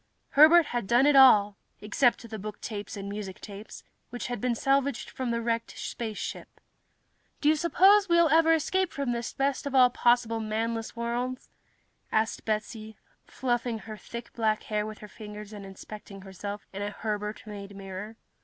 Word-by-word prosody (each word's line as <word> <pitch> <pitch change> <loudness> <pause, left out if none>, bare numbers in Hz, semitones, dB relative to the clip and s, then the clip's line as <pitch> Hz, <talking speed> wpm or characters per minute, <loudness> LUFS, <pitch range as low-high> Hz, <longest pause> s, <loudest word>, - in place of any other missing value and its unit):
Herbert 315 +3 +7
had 240 -7 -3
done 240 +5 +4
it 290 -1 +5
all, 210 -7 +7 0.2
except 235 +3 +1
the 220 -1 -7
booktapes 210 0 -6
and 200 0 -6
musictapes, 200 +1 -8 0.3
which 245 - -6
had 245 -4 -4
been 250 -2 0
salvaged 275 0 0
from 260 -2 -4
the 235 0 -1
wrecked 230 0 -2
spaceship. 220 -3 -6 0.8
"Do 295 - 0
you 310 - +5
suppose 380 +5 +4
we'll 340 -1 +5
ever 325 +2 +5
escape 370 +4 0
from 280 -3 -2
this 235 -1 -3
best 275 +1 -1
of 275 - -3
all 250 -1 +6
possible 240 -2 +2
manless 225 +1 -3
worlds?" 240 +2 -3 0.6
asked 220 0 0
Betsy, 215 0 -3 0.3
fluffing 240 -2 -1
her 215 0 -9
thick 235 +2 -9
black 220 -2 0
hair 210 0 -2
with 215 -1 -8
her 210 - -11
fingers 210 0 -10
and 200 -2 -8
inspecting 195 0 -10
herself 200 +2 -7
in 195 - -5
a 205 - -2
Herbert 210 0 -4
made 200 -1 -8
mirror. 195 +3 -7
225 Hz, 165 wpm, -28 LUFS, 210-255 Hz, 0.8 s, Herbert